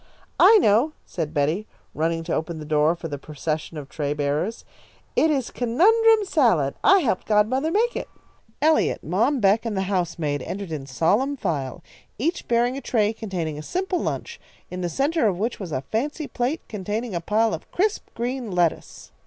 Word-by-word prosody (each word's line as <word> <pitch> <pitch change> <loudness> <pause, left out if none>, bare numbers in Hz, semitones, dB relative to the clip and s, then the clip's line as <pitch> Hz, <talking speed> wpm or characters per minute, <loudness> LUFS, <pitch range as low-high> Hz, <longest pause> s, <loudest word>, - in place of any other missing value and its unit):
"I 445 - +8
know," 250 - +3
said 160 -4 -4
Betty, 160 +8 0 0.3
running 165 +1 -1
to 165 - -3
open 160 +1 -2
the 155 - -7
door 155 +2 +2
for 165 - -6
the 145 -3 -5
procession 155 +2 -4
of 145 -2 -7
tray 145 0 -3
bearers. 150 +9 -2 0.5
"It 320 - +4
is 275 -5 0
conundrum 430 - +4
salad. 225 - +2
I 390 -1 +6
helped 225 - -1
godmother 225 +8 +2
make 455 +7 +1
it." - - -4 0.5
Eliot, 315 0 +2
Mom 230 - +1
Beck, 205 +1 +3
and 225 -4 -3
the 190 - +1
housemaid 170 -6 -1
entered 190 +5 -5
in 140 -4 -5
solemn 210 - +1
file, 155 - -3 0.3
each 325 - -2
bearing 240 +2 +2
a - - -5
tray 220 -4 +1
containing 175 -9 -4
a - - -5
simple 365 - -2
lunch, - - -4 0.3
in 180 0 -4
the 175 - -1
centre 275 - +1
of 190 -4 0
which 225 +5 -2
was 185 -5 -6
a 130 - -1
fancy 290 - -3
plate 255 +6 -2
containing 210 +2 -4
a 170 - -2
pile 215 +5 +1
of - - -6
crisp 415 +3 0
green 245 0 -3
lettuce. 175 -3 -1
210 Hz, 180 wpm, -24 LUFS, 160-265 Hz, 0.5 s, I